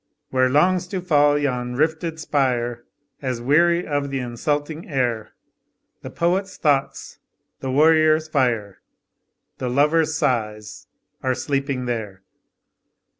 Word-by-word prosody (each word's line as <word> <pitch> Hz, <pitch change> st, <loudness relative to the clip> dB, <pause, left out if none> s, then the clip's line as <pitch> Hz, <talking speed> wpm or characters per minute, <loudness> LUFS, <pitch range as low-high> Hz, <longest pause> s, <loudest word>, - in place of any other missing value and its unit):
Where 130 Hz, 0 st, +3 dB
longs 180 Hz, +6 st, +2 dB
to 190 Hz, 0 st, -3 dB
fall 145 Hz, -5 st, +3 dB
yon 125 Hz, -4 st, -2 dB
rifted 160 Hz, +3 st, -1 dB
spire, 120 Hz, -6 st, -1 dB, 0.4 s
As 130 Hz, -4 st, -3 dB
weary 170 Hz, +7 st, +3 dB
of 145 Hz, -1 st, -2 dB
the 135 Hz, -, -3 dB
insulting 145 Hz, +6 st, -3 dB
air, 120 Hz, -6 st, -1 dB, 0.7 s
The -, -, -7 dB
poet's 190 Hz, +3 st, -1 dB
thoughts, 140 Hz, -3 st, -1 dB, 0.4 s
the 135 Hz, -, -4 dB
warrior's 155 Hz, +2 st, +4 dB
fire, 120 Hz, -9 st, -1 dB, 0.8 s
The 125 Hz, -, -2 dB
lover's 150 Hz, +4 st, +2 dB
sighs, 105 Hz, -7 st, -2 dB, 0.3 s
are 130 Hz, -1 st, 0 dB
sleeping 135 Hz, -2 st, -2 dB
there. 105 Hz, -6 st, -4 dB
140 Hz, 115 wpm, -22 LUFS, 125-155 Hz, 0.8 s, warrior's